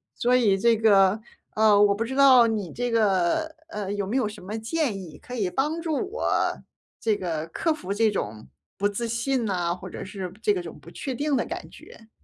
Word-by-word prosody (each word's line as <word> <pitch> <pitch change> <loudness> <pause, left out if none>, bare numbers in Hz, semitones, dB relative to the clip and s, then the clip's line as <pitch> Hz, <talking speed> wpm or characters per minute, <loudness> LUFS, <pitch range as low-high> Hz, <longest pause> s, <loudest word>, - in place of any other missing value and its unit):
所 245 +1 +2
以 225 -6 +4
这 230 +1 +4
个， 200 -2 +4 0.4
呃， 210 -1 +5
我 200 -1 +4
不 225 - -1
知 265 +3 -5
道 265 -3 +7
你 215 -6 -2
这 245 0 -3
个， 215 - +1
呃， 205 -6 -4
有 205 -1 -2
没 210 +7 -3
有 235 -6 +1
什 210 - -10
么 205 +4 -5
建 230 -3 -1
议 165 -5 -11
可 250 - -11
以 205 -7 -1
帮 300 - -1
助 320 -2 -1 0.2
我 470 - 0 0.4
这 220 -2 +1
个 165 -4 -3
克 320 - 0
服 250 -11 -7
这 215 +2 +2
种 110 - -4 0.3
不 200 - +2
自 220 +4 -3
信 235 +2 -1
呐， 175 -4 0
或 180 - -9
者 - - -7
是 190 -2 -6
这 210 - +3
个 180 - -2
种 165 -3 -9
不 155 +4 -14
确 260 +7 -5
定 290 +2 0
的 - - +1
感 - - -6
觉。 225 -1 -15
215 Hz, 230 characters per minute, -25 LUFS, 195-245 Hz, 0.4 s, 道